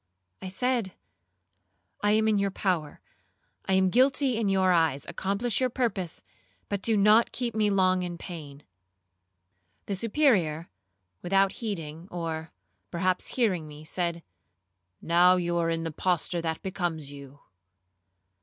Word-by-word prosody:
I 190 - -6
said, 225 0 -1 1.1
'I 205 - +3
am 220 0 +3
in 215 -2 +3
your 200 0 +1
power,—I 185 0 -5
am 190 -1 +3
guilty 260 +1 +3
in 220 -3 0
your 190 -1 +3
eyes,—accomplish 190 - 0
your 255 - +2
purpose, 205 -9 -2 0.5
but 200 -1 -2
do 225 0 +2
not 210 +3 +5
keep 240 -2 -3
me 215 -1 +2
long 185 -2 +3
in 175 -1 -4
pain.' 150 -5 -9 1.2
The 200 - -2
Superior, 195 - +1 0.5
without 195 +2 +2
heeding, 170 -7 -6
or 165 -3 -4 0.4
perhaps 180 +1 0
hearing 190 -11 +1
me, 150 0 -11
said, 170 0 -2 0.8
'Now 175 +2 +5
you 175 -1 -1
are 165 -1 +1
in 165 0 -1
the 165 - -3
posture 175 +1 0
that 160 -1 -3
becomes 170 -6 -3
you.' 140 0 -12
185 Hz, 130 wpm, -27 LUFS, 165-210 Hz, 1.2 s, not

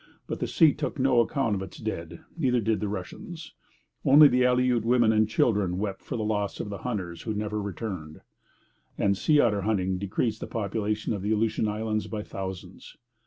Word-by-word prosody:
But - - -5
the - - -1
sea 160 -4 +5
took 150 0 -4
no 130 -2 +3
account 120 -1 +1
of 95 - -2
its 95 -2 -8
dead; 85 -7 -5
neither 130 -7 +1
did 110 -2 0
the 105 - -2
Russians. 105 - -7 0.5
Only 145 +2 +8
the 125 -2 +2
Aleut 125 -2 +2
women 120 -1 +4
and 110 0 +3
children 100 -6 +1
wept 100 -1 -3
for - - -5
the 110 - -2
loss 105 -2 -1
of 105 - -4
the 100 - -5
hunters 90 -9 -4
who 110 -2 -3
never 105 0 -2
returned; 95 -5 -6 0.8
and 100 0 +2
sea 150 +9 +3
otter 105 -6 +3
hunting 95 -3 0
decreased 105 +3 -1
the - - -6
population 105 0 -2
of 100 - -4
the 105 +2 -1
Aleutian 110 0 +1
Islands 110 0 -2
by 105 -2 -4
thousands. 95 -2 -8
110 Hz, 190 wpm, -27 LUFS, 100-120 Hz, 0.8 s, Only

